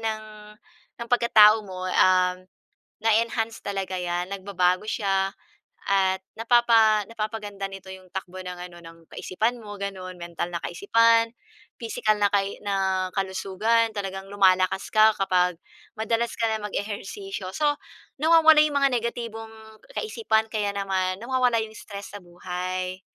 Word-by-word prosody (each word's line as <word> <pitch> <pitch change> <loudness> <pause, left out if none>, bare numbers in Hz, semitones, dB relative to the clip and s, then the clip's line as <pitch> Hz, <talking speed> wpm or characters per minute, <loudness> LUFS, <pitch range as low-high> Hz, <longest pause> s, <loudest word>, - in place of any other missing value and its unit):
ng 220 -1 -3 0.8
ng 235 - -8
pagkatao 225 -3 +6
mo, 185 -1 -7
um, 185 0 +3 0.7
na-e-enhance 225 0 +1
talaga 190 -2 -3
'yan, 175 +1 -3
nagbabago 185 0 0
siya 195 -2 0 0.6
at 190 -1 +2
napapa 225 -2 +4
napapaganda 215 -3 -5
nito 195 0 -10
yung 185 -1 -12
takbo 185 0 -6
ng 180 -1 -7
ano, 175 - -15
ng 165 0 -12
kaisipan 225 +6 -2
mo, 205 -1 -8
gano'n. 185 -2 -6
Mental 170 0 -5
na 170 - -3
kaisipan, 230 - +3 0.5
pisikal 220 -2 0
na 205 - +4
kai 200 0 -1
na 190 -2 0
kalusugan. 195 +4 +1
Talagang 195 -1 -5
lumalakas 190 -1 +2
ka 215 0 +6
kapag 180 -2 +1 0.4
madalas 230 +2 -1
ka 230 - +1
na 220 -1 -2
mag-ehersisyo. 205 - -5
So, 295 -1 +2 0.5
nawawala 320 -1 +7
yung 300 -1 +1
mga 275 -1 +3
negatibong 230 -1 -5 0.5
kaisipan, 430 - 0
kaya 210 -2 -1
naman 190 -2 -1
nawawala 250 -1 +2
yung 220 0 -10
stress 200 -2 -9
sa 205 - -7
buhay. 180 +1 -5
200 Hz, 130 wpm, -25 LUFS, 185-225 Hz, 0.8 s, nawawala